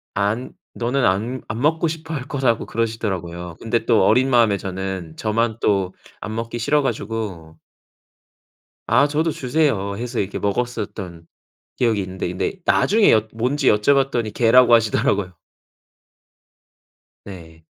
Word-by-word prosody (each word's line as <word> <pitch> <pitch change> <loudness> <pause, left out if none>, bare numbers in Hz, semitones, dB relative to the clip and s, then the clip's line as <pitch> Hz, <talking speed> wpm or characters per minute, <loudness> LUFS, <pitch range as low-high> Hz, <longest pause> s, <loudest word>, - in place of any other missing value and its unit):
안 105 +5 -1 0.2
너는 125 +2 0
안 110 +8 0
안 110 +3 -4
먹고 160 +3 +2
싶어 160 0 -5
할 135 -4 -3
거라고 130 -5 0
그러시더라고요. 95 -7 -3
근데 115 +1 -1
또 110 -5 +4
어린 130 +1 +3
마음에 115 -5 +4
저는 95 -4 -5
저만 110 +1 0
또 95 -3 +1 0.3
안 110 0 -5
먹기 115 +1 -4
싫어 145 +5 +2
가지고 100 - -4 1.3
"아, 145 - +4
저도 155 +2 0
주세요." 125 -9 0
해서 120 0 -4
이렇게 100 +1 -4
먹었었던 100 -6 -4 0.5
기억이 115 -5 +1
있는데. 95 -1 -4
근데 95 - -3
나중에 215 +1 +4
여 110 0 +3
뭔지 130 +5 -1
여쭤봤더니 120 -1 +1
개라고 120 +1 +5
하시더라고요. 105 -4 +2 1.9
네. 80 -4 -12
115 Hz, 285 characters per minute, -21 LUFS, 95-125 Hz, 1.9 s, 개라고